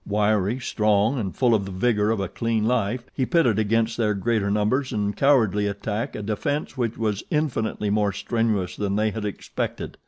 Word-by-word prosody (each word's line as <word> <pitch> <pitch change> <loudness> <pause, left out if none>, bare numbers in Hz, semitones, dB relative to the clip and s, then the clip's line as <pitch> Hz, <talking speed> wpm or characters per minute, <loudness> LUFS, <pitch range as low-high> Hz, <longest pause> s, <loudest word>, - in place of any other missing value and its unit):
Wiry, 105 +2 +1
strong 110 +1 +1
and 95 -5 -4
full 125 -3 +3
of 105 -3 +1
the 95 - -6
vigor 105 +2 +1
of 110 -2 +1
a 95 - -1
clean 115 +2 -1
life, 120 0 0
he 135 - -1
pitted 125 - +3
against 115 +2 +1
their 105 -3 +1
greater 105 0 0
numbers 105 +7 +1
and 105 -1 -1
cowardly 110 -8 +3
attack 105 +5 -3
a 105 - -5
defense 110 +10 -2
which 120 -3 -2
was 105 -3 -1
infinitely 115 -8 -1
more 105 -1 +2
strenuous 105 -2 -1
than 100 -1 -1
they 110 +1 +1
had 110 0 -4
expected. 100 - -5
110 Hz, 185 wpm, -24 LUFS, 105-120 Hz, -, full